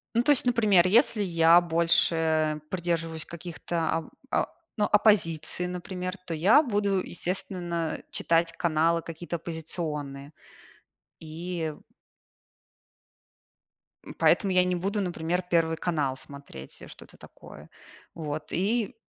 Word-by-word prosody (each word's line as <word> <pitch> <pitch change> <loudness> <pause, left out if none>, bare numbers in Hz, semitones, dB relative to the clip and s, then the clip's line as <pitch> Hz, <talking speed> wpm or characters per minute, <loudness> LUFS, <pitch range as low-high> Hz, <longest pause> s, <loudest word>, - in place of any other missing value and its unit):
Ну, 235 - +3
то 295 - +4
есть, 275 - +3
например, 215 -7 +4
если 225 +2 +3
я 170 -2 +5
больше 160 -2 +2
придерживаюсь 165 -3 -2
каких-то 170 -1 -3
оп 160 - -12 0.2
о - - +2 0.3
ну, 210 - +2
оппозиции, 180 -6 +2
например, 180 +1 -5
то 170 - -4
я 190 - +5
буду, 205 -6 0
естественно, 175 -2 -3
читать 165 0 +1
каналы 165 0 +1
какие-то 165 +1 -6
оппозиционные. 155 -4 -5 0.9
И 165 0 -5 2.3
м, - - -9
поэтому 195 - +3
я 180 0 +5
не 180 0 0
буду, 200 +4 -1
например, 175 -1 -2
"Первый 165 -1 +2
канал" 150 -7 -1
смотреть, 140 - -10
что-то - - -14
такое. - - -14 0.5
Вот 155 -2 -5
и 220 +6 0
170 Hz, 115 wpm, -27 LUFS, 160-185 Hz, 2.3 s, я